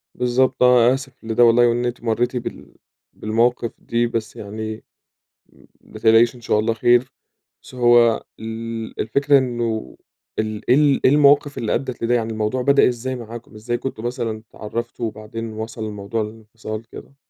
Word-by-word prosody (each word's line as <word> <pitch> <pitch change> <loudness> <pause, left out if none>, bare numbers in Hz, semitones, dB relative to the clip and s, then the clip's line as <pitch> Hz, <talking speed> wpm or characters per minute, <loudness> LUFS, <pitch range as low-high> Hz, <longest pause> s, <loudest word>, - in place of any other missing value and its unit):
بالضبط 125 +1 +1
آه، 125 0 +6
آسف 135 -1 -5
لده 115 +2 +2
والله 120 +1 +6
وإن 120 +1 0
أنتِ 120 -1 -4
مريتِ 120 +2 0
بال 120 - -6 0.4
بالمواقف 115 +2 0
دي، 120 0 0
بس 115 -2 -4
يعني 110 +1 -6 0.7
م - - -22 0.2
ما 110 - -13
تقلقيش 115 +2 +4
إن 120 - -14
شاء 110 -2 +1
الله 110 +1 0
خير. 120 +2 +3 0.5
بس - - -14
هو 120 -2 +4 0.2
ال 115 0 -6
الفكرة 140 +5 +3
إنه 120 - -3 0.4
إيه 110 - +2
ال 110 +2 -5
إيه - - +7
ال 145 -2 +3
إيه 130 - +6
المواقف 145 0 +4
اللي 110 - -1
أدِّت 130 -3 -3
لده؟ 120 +1 +2
يعني 115 -1 -1
الموضوع 110 +4 -1
بدأ 140 0 +4
إزاي 125 +1 -3
معاكم؟ 115 -1 -10
إزاي 120 +3 -3
كنتم 120 -3 -6
مثلًا 115 -3 -3
اتعرفتم 115 +2 -5
وبعدين 110 +1 -6
وصل 110 +1 -6
الموضوع 105 +1 -3
للانفصال 110 0 -8
كده؟ 140 - -12
115 Hz, 165 wpm, -21 LUFS, 110-125 Hz, 0.7 s, إيه